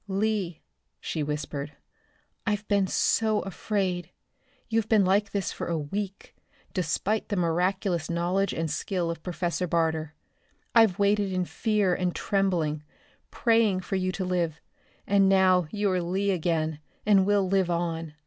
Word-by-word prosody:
"Lee," 195 -3 -1 0.4
she 160 - -3
whispered, 150 0 -4 0.7
"I've 210 0 -1
been 200 -2 +2
so 215 +2 +2
afraid. 185 -2 -2 0.6
You've 225 -2 0
been 215 -4 +5
like 200 +2 +2
this 200 -3 -2
for - - -5
a 170 - 0
week, 195 +6 -5 0.4
despite 190 +4 -1
the 205 - 0
miraculous 180 0 0
knowledge 175 +4 0
and 165 -1 -2
skill 180 -4 -1
of 165 - -7
Professor 175 +1 -2
Barter. 160 -2 0 0.6
I've 225 -6 +5
waited 200 -1 +2
in 185 -1 0
fear 210 -2 +1
and 180 -1 -1
trembling, 175 -7 0 0.5
praying 225 -5 +2
for 195 - -3
you 185 -1 0
to 185 0 -3
live, 170 -3 -1 0.5
and 195 -1 +4
now 185 -3 +4
you 205 0 0
are 180 -1 +1
Lee 190 +4 0
again, 160 -3 -1 0.3
and 200 -2 +5
will 200 -1 +2
live 190 -1 +2
on. 165 -2 -2
185 Hz, 145 wpm, -27 LUFS, 170-200 Hz, 0.7 s, been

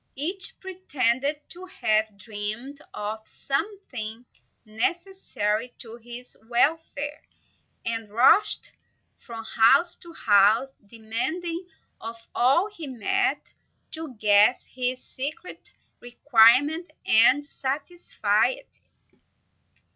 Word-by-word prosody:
Each 350 +7 -1
pretended 290 -6 -1
to 360 +1 -6
have 220 - 0
dreamed 215 +7 -6
of 210 +1 -4
something 275 - -4 0.4
necessary 235 - -2
to 230 -1 -9
his 240 +1 -9
welfare, 295 +3 0 0.6
and 225 -2 -3
rushed 250 - +4 0.5
from 230 -2 -9
house 270 +10 +4
to 340 - -12
house, 220 +1 +3
demanding 315 - -4 0.3
of 230 +1 -6 0.2
all 275 +11 +3
he 345 -8 -9
met 390 - -1 0.4
to 315 -5 -7
guess 210 +3 +4
his 255 0 -3
secret 290 +7 -5 0.3
requirement 255 +6 +4 0.2
and 255 +6 +5
satisfy 290 +5 -1
it. - - -8
255 Hz, 90 wpm, -25 LUFS, 225-325 Hz, 0.6 s, and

